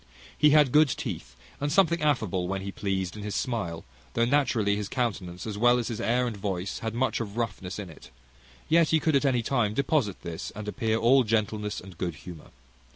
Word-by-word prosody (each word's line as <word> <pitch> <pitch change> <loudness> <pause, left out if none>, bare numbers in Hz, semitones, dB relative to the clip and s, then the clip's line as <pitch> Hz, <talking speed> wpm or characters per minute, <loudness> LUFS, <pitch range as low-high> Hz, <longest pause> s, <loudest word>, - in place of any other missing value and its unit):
He 150 - +5
had 150 -3 +5
good 155 +2 +6
teeth, 60 - -5 0.2
and 145 +1 -1
something 170 -2 +3
affable, 110 - +1
when 95 +1 -3
he 100 - -4
pleased, 95 -2 -2
in 105 - -7
his 105 0 -4
smile; 90 -10 -2 0.3
though 115 - +3
naturally 120 -6 +2
his 105 -1 -4
countenance, 100 -8 -3
as 105 -2 -5
well 120 +1 +5
as 120 - -2
his 115 - -4
air 125 +2 +2
and 120 -3 -3
voice, 95 -2 -3
had 110 0 -4
much 130 +2 0
of 110 -1 -5
roughness 95 -5 -3
in 100 -5 -6
it: 75 - -14 0.6
yet 165 -1 +4
he 160 - +4
could 155 -1 +1
at 140 - +3
any 125 -3 +2
time 110 -4 0
deposit 140 - 0
this, 85 -2 -5
and 105 0 -7
appear 110 0 0
all 130 +4 +5
gentleness 105 -1 -1
and 90 -2 -13
good 85 -3 -2
humour. 85 0 -11
110 Hz, 210 wpm, -27 LUFS, 95-130 Hz, 0.6 s, good